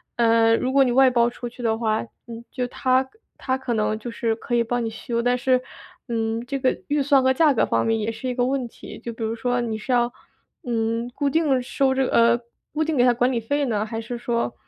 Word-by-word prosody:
呃， 230 -1 +4
如 255 - -1
果 275 0 +5
你 250 - +1
外 265 +1 +6
包 235 -2 +3
出 240 0 -6
去 245 +1 -11
的 225 -1 +2
话， 220 -2 0 0.3
嗯， 230 0 -8
就 250 -1 -2
他 260 +1 +1 0.3
他 260 0 -1
可 265 -2 -3
能 215 0 0
就 235 +2 -6
是， 230 -1 -1
可 235 - -7
以 235 - +3
帮 245 +1 -2
你 225 - -2
修， 235 +1 -3
但 245 +1 +1
是， 255 0 +2 0.5
嗯， 225 0 -1
这 275 +2 -3
个 260 0 0
预 290 0 +2
算 275 -1 +4
和 260 - +4
价 300 +1 +4
格 235 - +2
方 115 0 0
面， 225 - +1
也 220 +1 -1
是 255 +3 -6
一 250 - -2
个 245 - +1
问 260 -1 -1
题。 - - -11
就 235 - -6
比 225 - -6
如 220 0 -1
说 245 +1 -1
你 225 -2 -3
是 220 +4 -5
要， 240 0 +2 0.5
嗯， 230 0 -1
固 285 -1 0
定 285 -4 +2
收 265 +2 +1
这 265 - +2
个 - - -3
呃， 235 +1 +4 0.3
固 310 +1 0
定 315 -2 -1
给 245 - +5
他 245 - +5
管 245 +2 +1
理 240 - 0
费 285 +6 -1
呢， 215 -4 -1
还 225 +1 -5
是 240 +2 -6
说， 235 0 -2
240 Hz, 270 characters per minute, -23 LUFS, 230-260 Hz, 0.5 s, 外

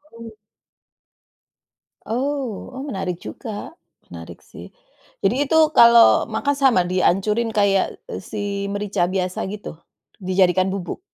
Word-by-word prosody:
Oh. 230 -1 -10 1.7
Oh 260 -2 -4
oh 260 - -7
menarik 190 - -5
juga, 220 -5 -7 0.4
menarik - - -11
sih. - - -13 0.5
Jadi 260 +8 +1
itu 320 - +1 0.2
kalau 235 0 +7
makan 280 +6 -1
sama, 265 -9 +4
dihancurin 195 +5 +1
kayak, 200 -2 +1
e - - -5
si 200 -1 -4
merica 205 -3 -1
biasa 185 0 -2
gitu, 200 -5 -8 0.4
dijadikan 185 -1 +1
bubuk? 195 - -5
205 Hz, 115 wpm, -21 LUFS, 190-235 Hz, 1.7 s, kalau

